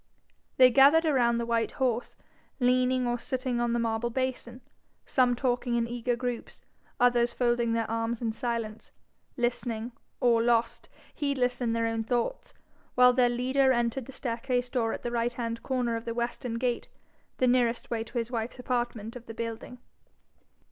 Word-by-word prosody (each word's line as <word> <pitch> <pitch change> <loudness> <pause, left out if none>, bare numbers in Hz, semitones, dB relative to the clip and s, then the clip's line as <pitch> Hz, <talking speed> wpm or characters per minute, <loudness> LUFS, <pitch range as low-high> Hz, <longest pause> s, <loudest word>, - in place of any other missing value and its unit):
They 255 -1 +7
gathered 280 +6 +6
around 245 -6 +3
the 235 - -1
white 230 -1 0
horse, 245 -2 -1 0.4
leaning 255 0 +2
or 240 0 -1
sitting 255 -2 -2
on 240 0 +1
the - - +1
marble 230 0 -1
basin, 255 -1 -3 0.4
some 250 -2 +2
talking 245 -1 0
in 235 -1 +1
eager 240 0 -1
groups, 245 -1 -5 0.4
others 240 -1 +3
folding 240 -1 +1
their 230 -1 0
arms 230 +1 -2
in 230 -2 -1
silence, 225 -1 -4 0.5
listening, 240 -1 -2 0.3
or 235 -2 +4
lost 235 0 +1 0.2
heedless 260 -4 -1
in 235 -2 0
their 230 0 0
own 225 0 -1
thoughts, 240 - -2 0.4
while 250 0 +7
their 250 -1 +4
leader 260 +2 +2
entered 240 0 0
the - - -8
staircase 245 0 -2
door 230 -3 0
at - - -5
the 240 - -3
right 240 0 0
hand 230 -1 -4
corner 250 -3 -1
of 230 +1 -5
the 230 -1 -4
western 235 0 -3
gate, 245 0 -1 0.5
the 255 - +2
nearest 245 -2 +1
way 225 -1 -1
to 230 +2 -8
his 235 +1 -2
wife's 230 0 -3
apartment 240 -3 -3
of 240 -1 -10
the 225 - -8
building. 230 +2 -5
240 Hz, 170 wpm, -28 LUFS, 230-250 Hz, 0.5 s, They